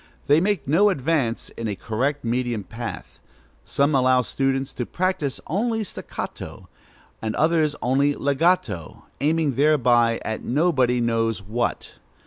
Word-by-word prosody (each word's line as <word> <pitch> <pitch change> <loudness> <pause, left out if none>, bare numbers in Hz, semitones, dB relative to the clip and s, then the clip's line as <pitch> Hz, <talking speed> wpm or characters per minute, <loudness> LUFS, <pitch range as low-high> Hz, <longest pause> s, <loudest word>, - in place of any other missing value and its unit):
They 145 +3 +4
make 195 -5 0
no 185 +9 +4
advance 140 - -1
in 115 - -5
a 105 - -2
correct 130 +8 -2
medium 120 -2 -1
path. 115 +3 -7 0.4
Some 140 +2 +1
allow 130 -1 +4
pupils 135 +1 -1
to 120 - -3
practise 180 -7 -1
only 220 - -1
staccato, 200 - -7 0.5
and 110 -1 -2
others 155 -1 +2
only 140 +3 +2
legato, 140 - 0
aiming 155 -1 +1
thereby 125 -6 +3
at 110 - -3
nobody 130 -4 +2
knows 115 -2 0
what. 115 +5 -3
135 Hz, 125 wpm, -23 LUFS, 120-155 Hz, 0.5 s, They